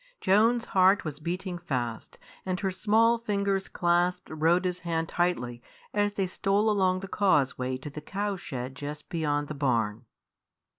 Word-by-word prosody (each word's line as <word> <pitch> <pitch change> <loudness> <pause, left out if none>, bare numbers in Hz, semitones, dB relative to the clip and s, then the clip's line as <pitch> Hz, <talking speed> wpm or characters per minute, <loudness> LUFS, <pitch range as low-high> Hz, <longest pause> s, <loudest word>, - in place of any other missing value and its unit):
Joan's 230 +5 +3
heart 190 +1 +4
was 150 -2 -5
beating 175 +2 -4
fast, 125 -9 -4 0.3
and 185 -1 -2
her 195 -2 0
small 225 +5 +3
fingers 200 -3 -1
clasped 175 +1 +1
Rhoda's 175 +3 +1
hand 165 -2 -2
tightly 125 -10 -1 0.3
as 205 0 +1
they 195 -2 0
stole 200 +3 +1
along 185 -2 +2
the 195 - -6
causeway 135 -10 +1
to 135 +3 -8
the 150 - -7
cow 200 +5 -2
shed 130 -7 -6
just 145 +3 -7
beyond 145 -4 -1
the 155 - -5
barn. 120 -5 0
175 Hz, 150 wpm, -28 LUFS, 145-195 Hz, 0.3 s, heart